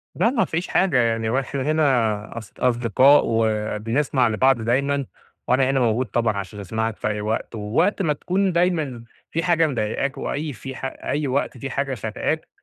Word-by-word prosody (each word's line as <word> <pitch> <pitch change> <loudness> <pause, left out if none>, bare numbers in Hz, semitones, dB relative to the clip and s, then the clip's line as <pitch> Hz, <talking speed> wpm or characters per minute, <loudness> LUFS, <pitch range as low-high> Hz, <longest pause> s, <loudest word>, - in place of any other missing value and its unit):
لأ 230 - +3
ما 240 -3 +1
فيش 170 +3 -3
حاجة 185 -9 +2
يعني، 115 -2 +1
وإحنا 135 +2 -1
هنا 125 -8 +1
أص 110 -3 -9
أصدقاء 125 +3 +4
وبنسمع 115 +4 0
لبعض 120 +2 +2
دايمًا 140 +4 0 0.4
وأنا 130 +1 +3
هنا 135 0 +2
موجود 120 +1 +1
طبعًا 110 -1 0
عشان 100 +1 -6
أسمعك 110 +3 -2
في - - -2
أي 105 -1 -2
وقت، 110 +2 -3
ووقت 110 - 0
ما 160 -5 +2
تكون 185 +6 0
دايمًا 160 -9 0 0.3
في 165 - -1
حاجة 165 -2 +3
مضايقاك 135 +1 -2
وأي 150 0 -3
في 130 +3 -8
أي 145 +2 -3
وقت 130 0 -1
في 135 +3 -5
حاجة 135 0 -2
خانقاك، 115 +8 -3
130 Hz, 165 wpm, -22 LUFS, 110-145 Hz, 0.4 s, أصدقاء